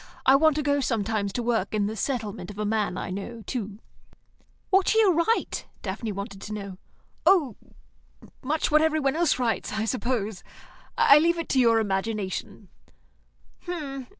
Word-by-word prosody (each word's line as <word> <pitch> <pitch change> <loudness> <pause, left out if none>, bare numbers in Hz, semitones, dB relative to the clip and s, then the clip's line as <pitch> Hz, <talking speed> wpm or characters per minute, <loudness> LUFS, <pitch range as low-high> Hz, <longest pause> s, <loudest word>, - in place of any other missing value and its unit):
I 265 - +7
want 310 +1 +4
to 300 - -1
go 285 0 +2
sometimes 215 -5 -1
to 245 - -2
work 225 -4 0
in 205 -1 +1
the 215 +2 -3
settlement 215 -6 -3
of 205 - -9
a 210 - -2
man 210 -3 -1
I - - -4
know, 215 +4 -6
too." 215 -5 -4 0.9
"What 385 0 +4
shall 445 - +4
you 395 -4 +4
write?" 335 +8 0 0.2
Daphne 215 +3 -4
wanted 200 0 -7
to 215 - -6
know. 200 -3 -6 0.5
"Oh, 320 - +4 0.9
much 305 +4 -1
what 305 +1 +5
every 315 0 +2
one 275 -1 0
else 335 -5 +2
writes, 240 -4 -1
I 220 +1 -1
suppose. 225 -4 -2 0.5
I 280 - +7
leave 340 +2 +2
it 335 - -4
to 265 - +2
your 230 -2 +5
imagination." 205 -1 -3
230 Hz, 165 wpm, -26 LUFS, 205-290 Hz, 0.9 s, I